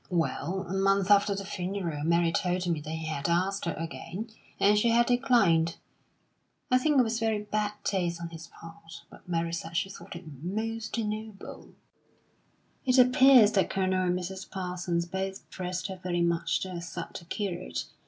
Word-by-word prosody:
Well, 180 +2 -1
a 185 - -4
month 195 0 +2
after 200 0 +5
the 195 0 -5
funeral, 180 -5 -3
Mary 170 +1 +3
told 180 +1 0
me 165 -3 0
that 150 - -8
he 160 0 -4
had 155 -1 -2
asked 185 +3 +1
her - - -1
again, 170 +6 -6 0.3
and 205 +1 +5
she 210 +3 +3
had 235 +1 +4
declined. 235 -11 +3 1.0
I 255 - +6
think 295 +2 +2
it - - +7
was 225 0 -1
very 220 -2 0
bad 210 0 -1
taste 175 -4 -1
on 170 0 -5
his 165 0 -9
part, 165 0 -12
but - - -16
Mary 165 -1 -1
said 165 0 -4
she 195 +2 -1
thought - - -10
it 170 +1 -9 0.2
most 220 +6 -3
noble. 215 -2 -5 1.1
"It 255 -1 +3
appears 255 -3 +7
that 195 -3 +2
Colonel 185 -1 +1
and 180 0 +1
Mrs. 190 +1 -6
Parsons 180 -2 -2
both 190 +2 -4
pressed 180 -1 -4
her 190 -1 -5
very 175 -1 -1
much 170 -1 +1
to 190 - -4
accept 170 0 -6
the 170 - -16
curate. 185 -1 -3
185 Hz, 175 wpm, -29 LUFS, 170-210 Hz, 1.1 s, it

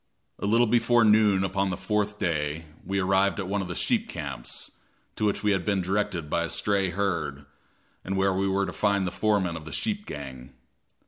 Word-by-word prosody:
A - - -2
little 115 +3 +4
before 120 +1 +4
noon 105 -3 +5
upon 95 0 0
the 90 - -2
fourth 105 -1 -1
day, 80 -2 -1 0.2
we 100 0 -1
arrived 95 +1 +2
at 95 - -3
one 100 +1 0
of 95 - -4
the 90 - -5
sheep - - 0
camps, 70 -5 -6 0.4
to 110 - -1
which 105 - 0
we 105 - +3
had 95 -3 +1
been 100 -2 +1
directed 95 -4 -1
by 85 - 0
a 85 - -3
stray 100 -2 +1
herd, 85 -7 -2 0.6
and 95 +1 -2
where 95 0 +3
we 95 +1 0
were 95 0 +1
to 90 - -5
find 100 -2 +1
the 90 - -2
foreman 100 -5 +1
of 80 -1 -7
the 80 - -8
sheep 210 -2 -2
gang. 65 -2 -8
95 Hz, 205 wpm, -27 LUFS, 85-105 Hz, 0.6 s, noon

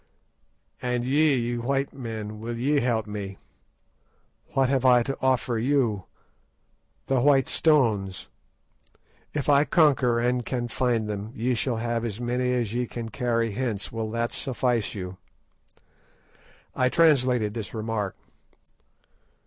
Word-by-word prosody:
"And 125 -1 -1
ye, 130 -3 +2
white 135 +3 -1
men, 110 -4 -6
will 115 +1 -5
ye 140 +5 +2
help 120 -4 0
me? 100 -2 -6 1.2
What 135 -1 +3
have 130 -1 +1
I 125 -2 +5
to 135 +2 -3
offer 130 -3 +1
you! 120 -6 +1 1.0
The 135 -1 +1
white 135 -1 +4
stones! 110 - +1 1.1
If 145 - -1
I 145 -1 +5
conquer 140 -8 +3
and 125 +1 +1
can 120 -1 -3
find 115 -2 0
them, 105 +1 -5
ye 125 +1 0
shall 120 0 -1
have 115 0 -2
as 115 -2 -4
many 125 +1 0
as 120 -4 -1
ye 125 0 -1
can 115 -1 -6
carry 115 +1 0
hence. 110 -3 -3
Will 110 -1 -3
that 115 +1 -2
suffice 125 -4 0
you?" 90 -1 -6 1.6
I 130 0 +2
translated 125 -9 +3
this 115 0 -6
remark. 110 -3 -2
120 Hz, 130 wpm, -26 LUFS, 110-130 Hz, 1.6 s, I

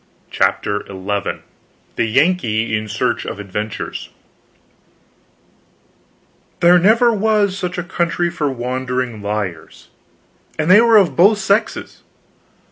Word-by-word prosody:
CHAPTER 105 0 0
XI 100 +1 -4 0.5
THE 115 - 0
YANKEE 115 -5 +1
IN 110 0 -3
SEARCH 105 +1 -1
OF - - -6
ADVENTURES 105 +2 -5 2.5
There 175 +1 +6
never 230 +6 +4
was 210 -2 +1
such 180 -1 -4
a 175 - -2
country 175 0 -1
for 155 -4 -2
wandering 125 -2 -3
liars; 100 -5 -5 0.7
and 155 +3 +1
they 205 +4 +8
were 230 -1 +5
of 195 -5 +3
both 200 +5 +5
sexes. 200 +2 -1
155 Hz, 110 wpm, -18 LUFS, -, 2.5 s, they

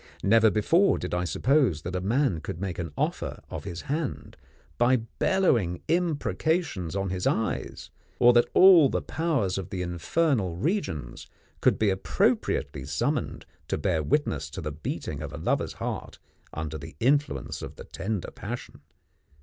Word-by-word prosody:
Never 110 +2 +5
before 165 - +3
did 90 - -5
I 90 0 0
suppose 120 - +2
that 90 +1 -4
a 90 - -1
man 110 - +1
could 80 - -6
make 95 -2 -4
an 85 -3 -4
offer - - -2
of - - -6
his 85 - -5
hand 150 +1 -4 0.4
by 120 +2 +5
bellowing 115 - +1
imprecations 160 - 0
on 95 -1 -1
his 90 -1 -1
eyes, 110 - -2 0.3
or 120 0 +6
that 120 0 +4
all 180 -7 +8
the - - -1
powers 140 - 0
of 95 - -6
the 90 -2 -3
infernal 95 - 0
regions 145 - -3 0.3
could - - +4
be 105 -2 +2
appropriately 95 - 0
summoned 70 0 -2 0.2
to - - -1
bear 80 +1 0
witness 75 - 0
to 95 - -7
the 75 -1 -4
beating 75 +2 -5
of - - -5
a - - -6
lover's - - -1
heart - - -5 0.3
under 80 -1 -5
the 80 +3 -10
influence 145 +5 0
of - - -7
the - - -10
tender 100 -1 -4
passion. - - -7
100 Hz, 160 wpm, -27 LUFS, -, 0.4 s, all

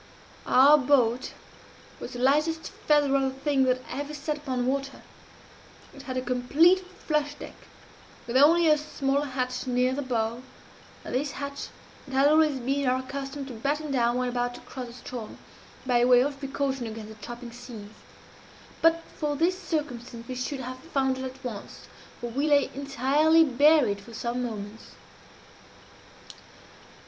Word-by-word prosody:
"Our 285 +4 +7
boat 255 -3 +2 0.7
was - - -7
the - - -6
lightest 305 +5 +1
feather 290 -2 +2
of 275 - +3
a 265 - +1
thing 270 0 +1
that 255 0 +1
ever 285 +3 -5
sat 295 +1 -3
upon 260 -4 -2
water. 275 +1 -2 0.9
It 275 - -11
had 260 -2 -5
a 255 - -1
complete 275 +9 +4
flush 300 -5 -2
deck, - - -9 0.7
with 235 +1 -5
only 325 +5 +6
a 305 -1 +5
small 280 -2 -1
hatch 255 -2 -3
near 250 +1 +2
the 285 - -2
bow, 235 -2 -2 0.6
and - - -6
this 275 +3 -1
hatch 280 0 -5 0.4
it 270 - -9
had 270 +2 +4
always 305 -3 +3
been 275 +2 -1
our 255 +1 +1
custom 275 +1 -5
to 265 - -8
batten 285 +6 -2
down 240 -2 +2
when 250 0 0
about 245 0 -2
to - - -11
cross 255 -2 -7
the 235 - -11
Ström, 245 -2 -8 0.5
by 245 -2 +3
way 245 0 +6
of 280 +1 -2
precaution 270 -2 -2
against 220 -1 -7
the - - -16
chopping 240 +2 -8
seas. 235 -4 -10 0.9
But 330 0 +4 0.2
for 295 -2 -1
this 350 +5 +1
circumstance 245 -7 -4
we 255 - -4
should 265 +2 -4
have 255 0 -6
foundered 265 -3 -1
at 260 +1 -9
once 220 -5 -7 0.4
for 240 -1 -5
we 280 +5 0
lay 285 -2 +3
entirely 280 +4 +3
buried 280 -6 +4
for 230 +1 -12
some 240 +2 -2
moments. 215 -2 -7
265 Hz, 160 wpm, -27 LUFS, 245-290 Hz, 0.9 s, Our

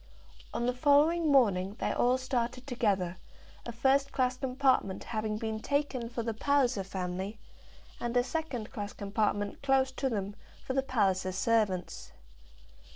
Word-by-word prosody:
On 235 - -2
the 250 - +1
following 295 +5 +4
morning 200 -7 +3
they - - -1
all 250 +1 +2
started 255 -1 -2
together, 200 -9 0 0.5
a - - -3
first 270 +4 +2
class 255 -1 +1
compartment 255 -6 +1
having 215 -2 -2
been 220 0 -3
taken 280 -2 -1
for 235 -1 -3
the 225 0 -2
Palliser 260 -3 +1
family, 190 +2 -4 0.6
and 240 +1 -1
a 245 - +4
second 265 -6 -4
class 205 0 -5
compartment 205 0 -1
close 270 -1 +2
to 265 +1 -1
them 205 -3 -3 0.3
for 260 - -2
the 270 - +2
Palliser 195 -8 +1
servants. 195 -2 0
235 Hz, 145 wpm, -30 LUFS, 205-265 Hz, 0.6 s, following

